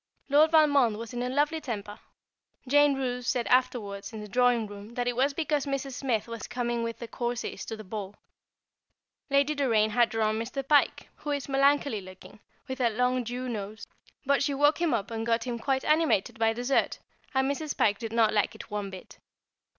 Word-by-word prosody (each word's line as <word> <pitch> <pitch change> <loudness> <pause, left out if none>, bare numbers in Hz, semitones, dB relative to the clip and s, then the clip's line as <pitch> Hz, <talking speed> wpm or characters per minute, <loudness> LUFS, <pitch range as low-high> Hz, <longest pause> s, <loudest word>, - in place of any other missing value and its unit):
Lord 300 +3 +5
Valmond 285 -8 +4
was 230 +2 -7
in 245 - -3
a 250 - -1
lovely 295 +4 +1
temper. 210 -6 -6 0.7
Jane 290 +1 +5
Roose 250 -2 -3
said 245 -3 0
afterwards 230 -6 0
in 220 - -7
the 210 - -7
drawing 245 0 +2
room 205 +2 -10
that 245 0 -1
it 245 - 0
was 270 +4 +2
because 300 -3 -1
Mrs. 275 -1 -3
Smith 245 -5 -1
was 230 -1 -6
coming 240 -1 -2
with 230 -1 -3
the 235 - -7
Courceys 240 +1 -4
to 225 - -6
the 215 - -9
ball. 205 0 -6 1.1
Lady 280 +2 +3
Doraine 225 -7 +2
had 240 +1 +3
drawn 220 -1 0
Mr. 260 +4 -4
Pike, 285 0 +3
who 300 - -7
is 285 -2 -2
melancholy 275 -4 +2
looking, 185 +2 -13 0.3
with 260 0 -4
a 240 - +4
long 250 +3 +1
Jew 245 +2 -4
nose; 215 -2 -5 0.4
but 280 +1 +2
she 280 0 0
woke 290 +4 +3
him 340 -3 +2
up 215 0 -3
and 225 0 -3
got 230 0 +1
him 240 -2 -4
quite 265 +2 -1
animated 300 -8 +2
by 225 0 +3
dessert, 245 +4 0 0.4
and 265 +1 +2
Mrs. 295 +1 -4
Pike 205 -2 +2
did 225 -2 -5
not 225 -2 +3
like 210 -1 +1
it - - -11
one 205 -1 -3
bit. 190 -1 -11
245 Hz, 195 wpm, -28 LUFS, 220-275 Hz, 1.1 s, Lord